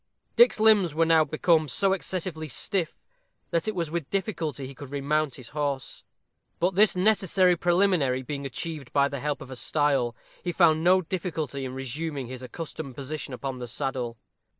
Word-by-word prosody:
Dick's 475 - +6
limbs 210 -7 +5
were 165 +1 +3
now 165 -1 +5
become 155 +1 +2
so 190 +9 +2
excessively 180 -4 -3
stiff, 170 - -1 0.6
that 170 +1 0
it 215 - -1
was 165 -4 -2
with 170 -4 -3
difficulty 170 -8 -2
he 135 - -8
could 140 +1 -10
remount 145 0 0
his 125 -4 -10
horse. 140 -4 -3 0.6
But 180 +3 +2
this 205 +2 +5
necessary 185 -2 +3
preliminary 175 -7 +2
being 140 +1 -5
achieved 140 +1 -5
by 140 -1 +3
the 140 - -5
help 145 +2 -2
of 130 - -9
a - - -6
stile, 135 -3 +1 0.3
he 175 - -1
found 160 -2 +4
no 185 +2 +5
difficulty 155 -6 -3
in 130 0 -6
resuming 135 +2 -4
his 130 +1 -7
accustomed 145 0 -7
position 140 0 -5
upon 130 0 -5
the 125 - -5
saddle. 125 -2 -3
155 Hz, 175 wpm, -26 LUFS, 135-175 Hz, 0.6 s, Dick's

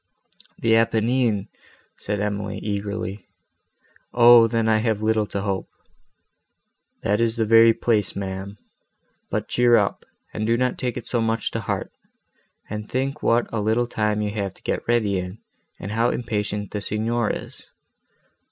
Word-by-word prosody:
"The 115 0 +3
Apennines!" 115 -2 +1 0.5
said 105 0 -3
Emily, 105 0 -2
eagerly, 100 0 -4 0.9
"O! 120 -1 +8
then 115 0 0
I 110 -1 +3
have 110 -2 -1
little 110 -1 +1
to 100 - -3
hope!" 95 -1 -3 1.3
"That 105 +3 +1
is 115 -1 +2
the 110 - +1
very 115 +1 +7
place, 110 -3 +1
ma'am. 95 +1 -5 0.7
But - - -2
cheer 120 -1 +4
up, 100 -3 -1 0.3
and 110 0 -2
do 115 +1 +3
not 125 0 0
take 125 -1 -2
it 120 - -6
so 120 - -1
much 115 0 -1
to - - -2
heart, - - -3 0.8
and 105 0 -6
think 135 +2 -2
what 120 +1 +2
a 110 - 0
little 110 +3 +1
time 105 -2 -1
you 105 - -2
have 100 -3 -3
to - - -18
get - - -3
ready 110 -5 +2
in, 90 +3 -6 0.4
and 100 - -6
how 115 +2 +2
impatient 105 -4 -3
the 105 - -3
Signor 110 +2 -1
is. - - -6
110 Hz, 155 wpm, -23 LUFS, 105-115 Hz, 1.3 s, O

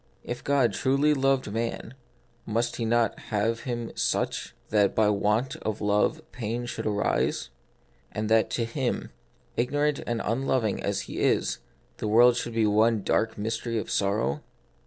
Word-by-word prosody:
If 120 - -5
God 140 -4 +2
truly 140 +3 +2
loved 135 -4 +1
man, 115 +2 -3 0.5
must 115 +2 -1
He 115 - -1
not 115 -1 +1
have 110 +2 0
made - - -1
him 120 -1 -4
such, - - -1
that 105 -2 +3
by 110 -1 +4
want 105 +5 0
of 110 -1 -3
love 105 +10 +1
pain 120 +1 -3
should 120 - -4
arise; 105 - 0 0.6
and 105 0 -2
that 110 0 +3
to 115 - -1
him 125 +2 -2 0.2
— - - -36
ignorant 145 +4 +1
and 120 -1 -1
unloving 115 -2 0
as - - -1
he - - -6
is 65 -2 +1 0.2
— - - -37
the - - -2
world 120 +3 +6
should 120 -1 -3
be 115 -1 +3
one 110 0 +3
dark 110 +3 +1
mystery 115 +2 -2
of 110 - -3
sorrow 100 -6 0
115 Hz, 165 wpm, -27 LUFS, 105-120 Hz, 0.6 s, world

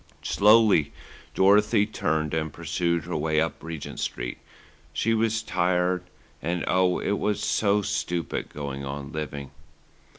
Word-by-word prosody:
Slowly 105 -7 +5 0.4
Dorothy 105 +2 +4
turned 80 -7 -1
and 80 -1 -1
pursued 85 +2 -1
her 90 - -4
way 80 0 +1
up 80 +1 -1
Regent 80 -2 -7
Street. - - -4 0.5
She 115 - +1
was 110 0 +1
tired 90 0 +1 0.4
and 85 +2 -1
and, - - -2
oh! 90 0 +3
it 100 0 -1
was 105 -1 -1
so 105 -1 +2
stupid, 90 -4 -2
going 70 -2 -5
on 70 +1 -6
living. 70 -3 -5
85 Hz, 135 wpm, -26 LUFS, 75-100 Hz, 0.5 s, Slowly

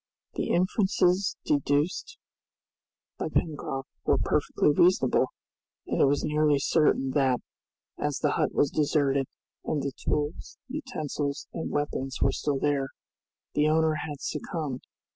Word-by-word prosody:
The - - -2
inferences 185 0 +2
deduced 150 - 0 1.0
by - - -2
Pencroft 135 -4 -2 0.2
were - - +3
perfectly - - +2
reasonable, 170 -4 +4 0.6
and - - 0
it - - +7
was 140 +1 +2
nearly 150 -1 +3
certain 140 -2 +2
that, 130 -3 +2 0.6
as 145 -1 -1
the 150 - +1
hut - - +1
was 145 - +2
deserted, 140 -3 +2 0.4
and 150 -3 -1
the 140 - -1
tools, 150 +3 -3
utensils, 155 - -3
and 165 - -3
weapons 135 -2 -2
were 135 - +3
still 145 0 -1
there, 140 -1 +1 0.7
the 150 +1 +3
owner 160 0 +3
had 145 -2 -6
succumbed. 150 -4 -3
150 Hz, 125 wpm, -28 LUFS, 140-160 Hz, 1.0 s, it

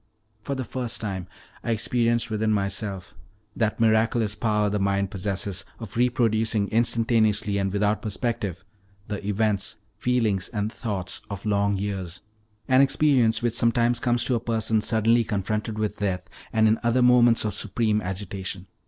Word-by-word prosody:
For 140 +5 -3
the 130 - -3
first 125 -1 -3
time 95 -5 -4 0.4
I - - -4
experienced 115 +1 +1
within 110 0 0
myself 100 -2 -2 0.4
that 110 -1 0
miraculous 110 -1 +2
power 105 -1 +1
the 105 0 -1
mind 100 0 0
possesses 95 -1 -2
of 115 -4 -9
reproducing 115 -3 +1
instantaneously, 110 -3 +2
and 95 -1 0
without 105 +1 +1
perspective, 105 -4 -3 0.4
the 105 -1 -4
events, 105 0 0 0.2
feelings, 115 -6 +1
and 105 -1 -3
thoughts 100 -6 -4
of 100 0 -6
long 100 -1 +1
years 95 -2 -4 0.4
an 130 +1 +5
experience 135 -5 +3
which 120 -2 +1
sometimes 120 +1 +2
comes 120 -1 +1
to 130 - +1
a 120 - +1
person 110 -1 0
suddenly 115 +2 +3
confronted 105 +1 -2
with 110 -1 -2
death, 95 -3 -1 0.3
and 110 -1 +3
in 110 +1 +3
other 120 +2 +2
moments 120 -2 +5
of 105 - -1
supreme 105 +1 0
agitation. 95 -1 -5
110 Hz, 150 wpm, -25 LUFS, 100-115 Hz, 0.4 s, an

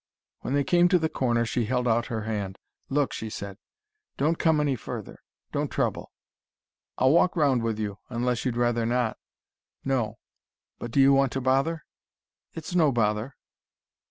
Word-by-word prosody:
When 135 - -2
they 145 - +3
came 175 +5 +4
to 180 0 +4
the 160 -2 0
corner, 120 -4 +1
she 115 0 -1
held 125 +2 0
out 120 0 +2
her 110 -2 -3
hand. 100 -3 -3 0.3
"Look!" 140 0 +1
she 110 - -5
said. 100 -1 -7 0.6
"Don't 160 +4 +1
come 160 -2 +3
any 145 -3 +1
further: 110 - -7 0.3
don't - - -1
trouble." - - -2 0.9
"I'll 130 +1 +4
walk 170 +3 +4
round 140 -7 +3
with 115 -1 -1
you: 105 -2 -4
unless 125 0 -1
you'd 125 -3 -1
rather 120 -1 +1
not." 120 -2 0 0.7
"No 120 -5 0 0.6
But 120 - -5
do 130 - 0
you 135 0 +7
want 135 -1 +3
to 135 - -1
bother?" 135 +5 +1 0.7
"It's 165 +2 -6
no 160 -5 +4
bother." 115 +1 0
125 Hz, 165 wpm, -26 LUFS, 115-140 Hz, 0.9 s, you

